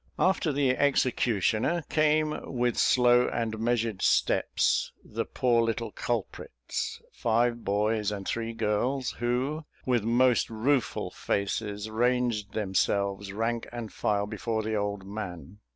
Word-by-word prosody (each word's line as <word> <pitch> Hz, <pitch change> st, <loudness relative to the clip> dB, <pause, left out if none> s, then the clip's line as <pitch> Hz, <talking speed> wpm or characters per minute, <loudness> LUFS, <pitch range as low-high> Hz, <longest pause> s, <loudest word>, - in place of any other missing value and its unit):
After 185 Hz, -4 st, +2 dB
the 140 Hz, -2 st, +2 dB
executioner 130 Hz, -, +1 dB
came, 155 Hz, 0 st, +1 dB
with 125 Hz, -2 st, 0 dB
slow 125 Hz, -1 st, +4 dB
and 110 Hz, -2 st, -2 dB
measured 115 Hz, -3 st, 0 dB
steps, -, -, +2 dB
the -, -, -3 dB
poor 120 Hz, -2 st, +2 dB
little 115 Hz, -1 st, -1 dB
culprits, 95 Hz, -, -4 dB
five 120 Hz, +1 st, +1 dB
boys 105 Hz, +1 st, +1 dB
and 100 Hz, -2 st, -5 dB
three 115 Hz, 0 st, -2 dB
girls, 115 Hz, +5 st, 0 dB
who, 130 Hz, +6 st, -1 dB, 0.2 s
with 125 Hz, -3 st, +2 dB
most 120 Hz, +2 st, +3 dB
rueful 120 Hz, +4 st, 0 dB
faces, 105 Hz, +1 st, -2 dB
ranged 115 Hz, -2 st, 0 dB
themselves, 100 Hz, -1 st, 0 dB
rank 115 Hz, +3 st, -2 dB
and 120 Hz, -3 st, -6 dB
file, 100 Hz, -1 st, 0 dB
before 110 Hz, +1 st, -3 dB
the 110 Hz, +1 st, -2 dB
old 100 Hz, -2 st, -2 dB
man. 100 Hz, -2 st, -7 dB
115 Hz, 120 wpm, -28 LUFS, 105-125 Hz, 0.2 s, slow